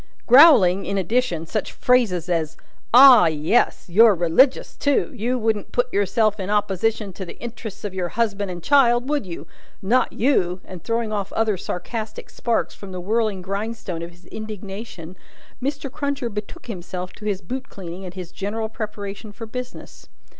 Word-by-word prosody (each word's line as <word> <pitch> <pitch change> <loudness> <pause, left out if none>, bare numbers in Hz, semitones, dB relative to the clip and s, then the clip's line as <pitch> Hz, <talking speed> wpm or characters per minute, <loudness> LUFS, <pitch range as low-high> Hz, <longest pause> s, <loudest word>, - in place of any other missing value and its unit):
Growling, 235 - +7
in 200 - -1
addition, 195 -3 0
such 210 +5 -3
phrases 215 -9 +1
as 160 -3 -1 0.3
"Ah! 245 -6 +9
yes! 160 +9 +1
You're 210 +4 +6
religious, 175 - +2
too. 285 +3 +1
You 245 +2 -1
wouldn't 220 -3 -1
put 245 0 -1
yourself 205 +2 +1
in 190 0 -4
opposition 210 0 0
to 190 - -7
the 175 - -9
interests 225 -3 -8
of 205 -2 -4
your 180 -2 -2
husband 205 -3 -1
and 175 -2 -7
child, 245 -2 +4
would 290 -8 -1
you? 170 - -7 0.3
Not 240 +6 +2
you!" 195 -8 +1
and 180 -3 -10
throwing 230 -1 -1
off 200 -2 -3
other 220 -2 +1
sarcastic 215 +5 -6
sparks 235 -2 -1
from 200 -2 -10
the 185 - -5
whirling 210 0 -1
grindstone 200 -2 -4
of 170 - -6
his 175 +1 -20
indignation, 200 -4 -8 0.4
Mr. 280 0 -3
Cruncher 280 -4 -2
betook 210 0 -7
himself 185 -3 -6
to 210 - -12
his 200 -3 -1
boot 260 +8 -6
cleaning 180 -1 -8
and 180 -1 -8
his 180 -2 -7
general 220 +4 -4
preparation 205 -2 -6
for 225 +2 -8
business. 250 +3 -8
210 Hz, 165 wpm, -22 LUFS, 185-235 Hz, 0.4 s, Ah